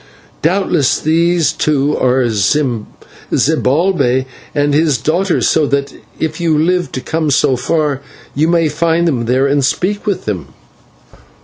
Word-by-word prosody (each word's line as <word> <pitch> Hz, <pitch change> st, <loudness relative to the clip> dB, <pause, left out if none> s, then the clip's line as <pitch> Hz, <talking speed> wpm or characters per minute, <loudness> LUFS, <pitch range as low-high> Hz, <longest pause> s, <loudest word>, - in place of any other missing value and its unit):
Doubtless 165 Hz, -5 st, +1 dB
these 165 Hz, +1 st, +1 dB
two 150 Hz, -1 st, 0 dB
are 130 Hz, 0 st, +2 dB
Zibalbay 130 Hz, -, 0 dB, 0.3 s
and 145 Hz, 0 st, +1 dB
his 150 Hz, -2 st, +2 dB
daughter, 170 Hz, -, 0 dB
so 155 Hz, -2 st, +2 dB
that 140 Hz, 0 st, -1 dB, 0.3 s
if 160 Hz, +1 st, -3 dB
you 160 Hz, -3 st, +2 dB
live 175 Hz, +3 st, 0 dB
to 130 Hz, -, -4 dB
come 160 Hz, +1 st, -2 dB
so 135 Hz, -1 st, +2 dB
far, 145 Hz, +1 st, -1 dB, 0.3 s
you 155 Hz, +3 st, +1 dB
may 165 Hz, -1 st, +2 dB
find 165 Hz, +3 st, 0 dB
them 125 Hz, -7 st, 0 dB
there 130 Hz, +3 st, +2 dB
and 140 Hz, 0 st, +1 dB
speak 205 Hz, -, -1 dB
with 200 Hz, -, -2 dB
them." 85 Hz, -11 st, -5 dB
150 Hz, 135 wpm, -15 LUFS, 130-165 Hz, 0.3 s, are